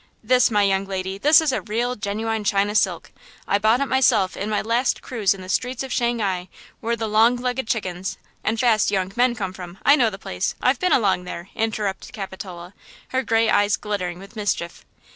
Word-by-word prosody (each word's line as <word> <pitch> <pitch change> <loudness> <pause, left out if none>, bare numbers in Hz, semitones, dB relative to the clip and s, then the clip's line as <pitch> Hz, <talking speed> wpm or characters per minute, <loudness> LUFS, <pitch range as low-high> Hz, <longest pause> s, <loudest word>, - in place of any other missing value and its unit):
"This, 255 0 +4
my 210 -2 +2
young 195 0 +1
lady, 190 0 -4
this 300 +7 +6
is 310 -3 +1
a 255 - -1
real, 235 +3 -2
genuine 220 +1 -2
China 200 +1 +1
silk. 215 - 0 0.4
I 200 - +2
bought 220 +5 +3
it - - +2
myself 260 -8 +2
in 205 - -4
my 210 - +1
last 235 +3 0
cruise 210 -6 0
in 190 - -10
the 185 - -9
streets 250 +6 -1
of 265 - -5
Shanghai 205 -7 -1 0.3
where 235 +1 -1
the 225 -1 -3
long 220 +3 +4
legged 250 0 -2
chickens–" 190 -5 -3 0.3
"And 225 +1 0
fast 225 -4 +3
young 190 -2 -1
men 245 0 +3
come 190 -5 -4
from! 180 -1 -9
I 285 - +7
know 245 -6 +3
the 195 - -8
place! 90 - -3
I've 255 0 +2
been 365 - +1
along 195 -9 +2
there!" 175 +1 -7
interrupted 215 -3 -2
Capitola, 190 -3 -8 0.4
her 260 - 0
gray 225 -2 +2
eyes 205 -1 +3
glittering 185 -4 -3
with 195 +2 -13
mischief. 205 -5 -3
215 Hz, 200 wpm, -22 LUFS, 195-240 Hz, 0.4 s, I